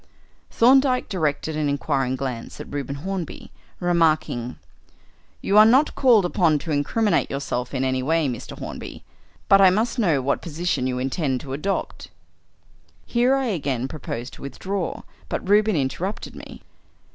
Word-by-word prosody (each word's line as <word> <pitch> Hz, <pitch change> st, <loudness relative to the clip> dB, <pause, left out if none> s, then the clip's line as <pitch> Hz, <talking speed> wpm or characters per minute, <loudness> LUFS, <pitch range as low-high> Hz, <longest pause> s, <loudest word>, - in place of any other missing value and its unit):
Thorndyke 255 Hz, +1 st, +4 dB
directed 160 Hz, -4 st, -1 dB
an 150 Hz, -1 st, 0 dB
inquiring 135 Hz, -2 st, 0 dB
glance 130 Hz, -3 st, -5 dB
at -, -, -9 dB
Reuben 140 Hz, -1 st, -3 dB
Hornby, 190 Hz, -4 st, -5 dB, 0.3 s
remarking 160 Hz, -8 st, +1 dB, 0.8 s
"You 205 Hz, +2 st, +4 dB
are -, -, +10 dB
not 260 Hz, +7 st, +4 dB
called 235 Hz, -8 st, +4 dB
upon 170 Hz, -4 st, +2 dB
to 155 Hz, +3 st, -5 dB
incriminate 200 Hz, +9 st, +1 dB
yourself 135 Hz, -2 st, -3 dB
in 135 Hz, -1 st, -1 dB
any 130 Hz, 0 st, 0 dB
way, 160 Hz, +3 st, +1 dB
Mr. 120 Hz, -4 st, -6 dB
Hornby, -, -, -8 dB, 0.4 s
but 195 Hz, 0 st, +6 dB
I 190 Hz, -, +8 dB
must 225 Hz, +6 st, 0 dB
know 170 Hz, -10 st, +3 dB
what 135 Hz, +2 st, -1 dB
position 170 Hz, -5 st, -2 dB
you 125 Hz, -1 st, -2 dB
intend 130 Hz, +1 st, -1 dB
to 135 Hz, -2 st, -7 dB
adopt." 195 Hz, +8 st, -3 dB, 1.0 s
Here 245 Hz, +3 st, +2 dB
I 270 Hz, -1 st, 0 dB
again 135 Hz, -, -2 dB
proposed 130 Hz, -4 st, -6 dB
to -, -, -13 dB
withdraw, 180 Hz, +7 st, -4 dB, 0.3 s
but -, -, -4 dB
Reuben 210 Hz, 0 st, +4 dB
interrupted 165 Hz, +8 st, -3 dB
me. -, -, -11 dB
155 Hz, 145 wpm, -23 LUFS, 135-200 Hz, 1.0 s, are